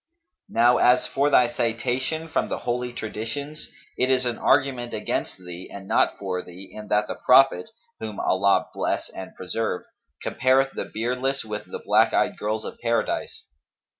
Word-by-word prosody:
Now 120 +1 +4
as 125 +1 +4
for 140 +1 +1
thy 125 -4 +5
citation 125 +7 -1
from 160 - -1
the - - -2
Holy 125 0 -2
Traditions, 120 +7 -5 0.3
it 130 - +2
is 130 -1 +3
an 120 -2 -2
argument 125 -4 +2
against 105 - -3
thee 90 0 -9
and 95 -1 -9
not - - +2
for 95 -2 -3
thee 90 +2 -12
in 105 0 -8
that 105 0 +2
the - - -4
Prophet 135 - +5 0.3
(whom 110 -2 -6
Allah 100 +1 +2
bless - - -2
and 95 - -9
preserve!) 95 +1 -3 0.4
compareth 135 +1 +2
the - - -4
beardless 125 +4 -1
with 105 -1 -5
the - - -4
black - - +4
eyed - - +2
girls 110 +1 -3
of - - -7
Paradise. 115 0 -1
120 Hz, 165 wpm, -24 LUFS, 105-130 Hz, 0.4 s, thy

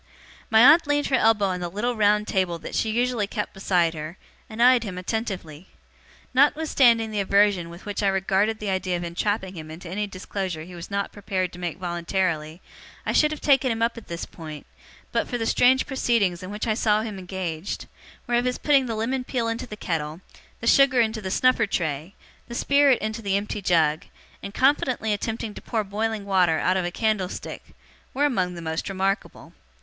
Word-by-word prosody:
My 220 0 +6
aunt 290 +6 +7
leaned 290 0 +1
her 270 - +3
elbow 225 -4 +3
on 185 -2 -1
the 175 -1 -3
little 235 +7 -2
round 210 0 +3
table 185 -3 0
that 165 - -9
she 220 - 0
usually 235 -2 0
kept 210 0 -4
beside 180 -4 +1
her, 155 +3 -7 0.3
and 220 0 -9
eyed 245 0 +6
him 190 -5 -6
attentively. 185 -5 -4 0.7
Notwithstanding 260 -5 +4
the 210 - -2
aversion 200 -3 +2
with 170 +2 -12
which 205 0 -3
I 200 - +2
regarded 195 +3 +1
the 210 -2 -3
idea 185 -1 -1
of 175 - -5
entrapping 190 +3 -2
him 155 -2 -8
into 165 +3 -9
any 205 +4 -2
disclosure 185 -3 -5
he 180 +2 -11
was 170 -1 -8
not 200 0 -2
prepared 190 -3 -3
to 180 - -10
make 175 -3 -4
voluntarily, 175 -2 -2 0.4
I - - 0
should 300 - +4
have 305 -1 -6
taken 270 -3 +3
him 225 0 -1
up 230 0 +1
at 230 - -11
this 170 0 -5
point, 155 -3 -10 0.5
but - - 0
for 245 - -2
the 225 - -2
strange 255 +3 +4
proceedings 230 -9 0
in 185 - -7
which 210 +1 -4
I 220 - +1
saw 215 -1 +2
him 210 -4 -6
engaged; 180 -1 -5 0.4
whereof 240 0 +1
his 250 0 0
putting 275 -3 +3
the 225 - -2
lemon 250 +4 -1
peel 245 -2 -2
into 230 +2 -3
the 210 - -8
kettle, 160 -3 -3 0.4
the - - -5
sugar 260 +1 +5
into 220 -1 +1
the 190 - -4
snuffer 240 +2 +3
tray, 160 0 -3 0.3
the 235 - -7
spirit 280 0 +4
into 220 +1 -3
the 200 -2 +1
empty 210 +1 -4
jug, 160 -4 +2 0.4
and 200 - -6
confidently 255 -3 +1
attempting 220 +1 -3
to - - -10
pour 225 -3 -2
boiling 210 +1 -3
water 180 -5 +3
out 185 - +1
of 185 -2 0
a - - -1
candlestick, 215 -3 -3 0.4
were 285 +2 +2
among 185 -10 0
the 170 - -7
most 160 +4 -3
remarkable. 195 +1 -3
205 Hz, 200 wpm, -24 LUFS, 180-230 Hz, 0.7 s, aunt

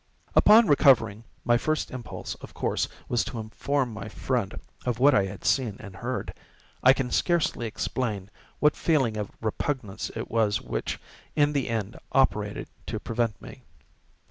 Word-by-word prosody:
Upon 225 +2 +8
recovering, 125 - +4 0.2
my 120 0 +4
first 155 +2 -1
impulse, 125 -3 -6
of - - -11
course, - - 0 0.2
was 120 -4 +1
to 120 - -6
inform 125 +3 -1
my 105 -1 -6
friend 120 -6 -2 0.2
of 125 -2 -1
what 140 +4 +6
I 100 -4 +4
had 95 0 -8
seen 120 -7 +1
and 100 -1 -10
heard—and 125 +5 -4 0.5
I 130 - +8
can 130 -2 0
scarcely 170 -9 +1
explain 110 -3 -3 0.3
what 150 0 +4
feeling 135 -9 +2
of 105 -2 -3
repugnance 110 -2 -2
it 115 - -5
was 110 -2 +2
which, - - -3 0.4
in 145 -1 +3
the 140 -4 0
end, 110 0 -3
operated 105 -6 +1 0.2
to - - -3
prevent 115 -3 -1
me. - - -11
120 Hz, 155 wpm, -27 LUFS, 105-135 Hz, 0.5 s, Upon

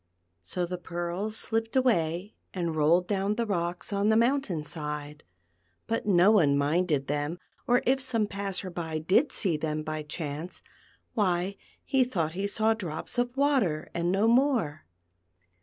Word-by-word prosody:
So 175 - -2
the 180 +1 -5
pearls 175 +5 -3
slipped 225 +1 -1
away, 195 -6 +1 0.2
and 170 -3 -1
rolled 160 +4 +3
down 200 0 0
the 235 +1 0
rocks 175 -1 -2
on 200 +1 +2
the 220 - +4
mountain 235 - +1
side, 150 -1 -5 0.6
but 225 -1 -2
no 190 +1 +6
one 150 -10 +4
minded 150 0 +1
them, 145 +4 -2 0.3
or 245 0 +3
if 265 +2 +2
some 240 -5 0
passer 195 -2 -3
by 160 -2 -3
did 185 - +2
see 180 -7 0
them 155 0 -2
by 155 0 -3
chance, 150 +2 -5 0.5
why 190 -2 +1 0.3
he 265 -1 +3
thought 175 -11 -1
he 195 +4 -2
saw 220 +2 +2
drops 185 +1 -4
of 245 +2 -1
water 255 - +1
and 170 +1 0
no 200 +4 +2
more. 230 - +2
180 Hz, 155 wpm, -28 LUFS, 160-220 Hz, 0.6 s, no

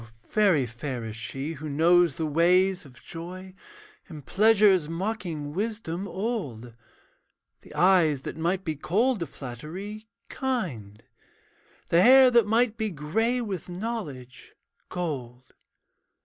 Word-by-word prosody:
very 195 - +3
fair 120 +1 -5
is 110 -1 -6
she 135 +7 -5
who 155 0 -7
knows 165 +1 +4
the 160 - -2
ways 180 +4 +3
Of 125 -3 -16
joy: 185 +3 -8 0.6
in 155 -4 -9
pleasure's 200 - +4
mocking 165 -5 -4
wisdom 200 -2 -3
old, 175 - -4 0.9
The - - -16
eyes 170 -7 +4
that - - -5
might 175 +3 -1
be 160 -2 -2
cold 215 - +1
to 170 - -3
flattery, 180 - -8 0.2
kind; 130 - -4 0.9
The 170 - +5
hair 260 +3 +8
that 235 -3 +4
might 225 +1 +2
be 220 -1 -1
grey 220 - -1
with 195 -7 -5
knowledge, 175 - -6 0.3
gold. 130 -8 -5
175 Hz, 120 wpm, -26 LUFS, 145-210 Hz, 0.9 s, hair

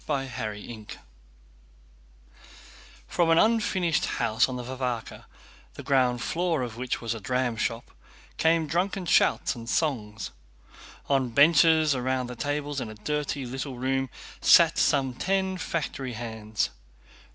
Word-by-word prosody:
CHAPTER 130 -7 -3
XXIII 105 0 -10 2.2
From 170 -2 +1
an 165 - +5
unfinished 190 -6 +2
house 115 0 +2
on 130 - -4
the 125 - -5
Varvárka, 125 -2 -4 0.5
the - - -8
ground 125 -3 +2
floor 165 -5 0
of 120 -2 -5
which 125 +1 -3
was 115 -1 -2
a 115 - -6
dramshop, 120 0 -2 0.5
came 165 0 +3
drunken 180 +4 -1
shouts - - +3
and 115 -1 -9
songs. 110 - -1 0.8
On 135 -3 +1
benches 155 +3 +5
round 130 0 -1
the - - -7
tables 145 +1 -2
in 115 - -5
a 110 - -9
dirty 145 +3 -3
little 135 +1 -5
room 135 +1 -1 0.3
sat - - +6
some 135 -3 +2
ten 190 +5 -1
factory 135 -7 -3
hands. 110 -2 -3
130 Hz, 130 wpm, -27 LUFS, 120-155 Hz, 2.2 s, sat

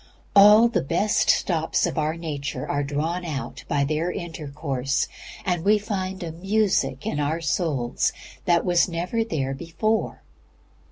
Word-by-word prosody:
All 210 +3 +8
the 230 -5 0
best 175 +9 +1
stops 160 -3 +2
in - - -2
our 155 0 0
nature 140 -5 -4
are 145 - 0
drawn 155 +5 -2
out 150 -6 -5
by 145 -3 +1
their 155 +5 0
intercourse, 145 -6 -3 0.4
and 175 -3 0
we 210 +2 +5
find 190 -3 -4
a 165 - -4
music 180 -7 0
in 150 - -2
our 150 +3 0
souls 150 -6 0 0.3
that 170 -1 +3
was 175 0 +3
never 180 +7 -1
there 140 -11 -2
before. 170 +9 -2
165 Hz, 145 wpm, -24 LUFS, 145-185 Hz, 0.4 s, All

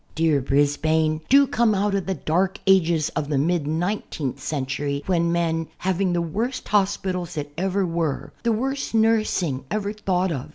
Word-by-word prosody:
Dear 160 -3 +2
Brisbane, 155 +3 +1
do 280 +1 +7
come 235 -4 +2
out 200 +1 0
of 195 -2 -1
the 190 - -1
dark 180 +5 0
ages 170 -5 +3
of 150 -3 -3
the 145 - +1
mid 160 +1 +1
nineteenth 160 - -2
century 140 0 -2
when 170 -2 +1
men 165 -1 0
— - - -35
having 190 0 +1
the 170 -1 0
worst 230 +10 -3
hospitals 190 -4 0
that 145 -1 -4
ever 190 +2 0
were, 165 -4 -2
the 235 - +1
worst 265 +2 -2
nursing 215 -11 +1
ever 210 -1 -2
thought 190 -3 0
of. 135 -5 -4
175 Hz, 170 wpm, -23 LUFS, 155-200 Hz, -, do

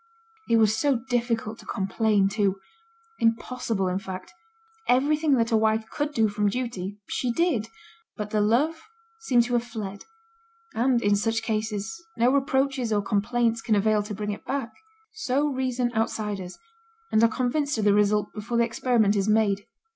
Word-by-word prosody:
It 230 - +5
was 215 -1 +4
so 280 +4 +2
difficult 235 -2 -2
to - - -14
complain, 200 +1 +1
too; 195 -1 0 0.6
impossible, 230 -3 0
in 185 +1 -1
fact. 190 - -8 0.5
Everything 290 +3 +3
that 230 0 +1
a - - +4
wife 220 0 +2
could 295 0 -2
do 225 -6 +2
from 205 0 0
duty 205 -4 -4
she 250 - -1
did; 265 -6 +1 0.5
but 210 -1 -5
the 215 - +2
love 280 +10 +2 0.4
seemed 250 - +3
to 245 +1 -4
have 240 -1 +2
fled, 205 -4 -7 0.7
and, 240 +1 +2
in 205 0 +4
such 225 +2 0
cases, 220 +6 -3
no 240 +2 +4
reproaches 270 -3 +1
or 205 -1 +1
complaints 230 +3 0
can 220 - +1
avail 210 +1 +2
to 210 0 -6
bring 210 +1 -3
it 205 - -7
back. 270 -5 -3 0.4
So 290 -7 0
reason 255 -2 -1
outsiders, 210 -4 -2 0.5
and 220 - +4
are 230 - +6
convinced 260 +4 -1
of 215 - 0
the 205 - +5
result 210 0 +2
before 225 +2 -3
the 235 - +4
experiment 235 -3 +2
is 200 +1 +1
made. 210 -1 +2
225 Hz, 165 wpm, -26 LUFS, 210-250 Hz, 0.7 s, are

